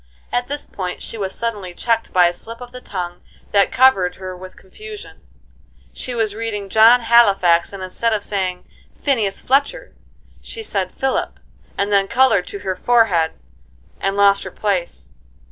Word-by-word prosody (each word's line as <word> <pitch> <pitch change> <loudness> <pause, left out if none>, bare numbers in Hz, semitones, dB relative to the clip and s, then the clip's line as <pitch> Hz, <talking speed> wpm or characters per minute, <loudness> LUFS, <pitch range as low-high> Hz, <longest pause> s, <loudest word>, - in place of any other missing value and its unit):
At 245 0 -1
this 290 +1 -4
point 180 -2 -5
she - - -6
was 195 -3 -3
suddenly 205 -6 -4
checked 230 +2 0
by 180 -1 +5
a 175 - +2
slip 230 +5 -9
of 245 -1 -10
the 250 - -10
tongue 175 -4 -5 0.3
that 200 -1 +3
covered 245 -9 +4
her 185 -1 -7
with 185 +1 -12
confusion. 425 - -11 0.7
She 250 - -6
was 220 -3 0
reading 210 -3 -4
"John 225 +4 +6
Halifax," 195 -8 +4
and 195 -2 -7
instead 230 +5 -1
of 210 -2 -1
saying 185 -3 -3 0.4
"Phineas 225 -9 0
Fletcher" 280 - 0 0.5
she 450 - -7
said 195 - -2
Philip, 265 0 -2 0.4
and 200 +1 0
then 195 -1 +3
colored 235 -7 +3
to 200 - -6
her 190 -1 -2
forehead, 190 -7 +2 0.7
and 195 +1 -1
lost 200 0 +5
her - - -6
place. 195 -5 -3
205 Hz, 160 wpm, -19 LUFS, 185-235 Hz, 0.7 s, John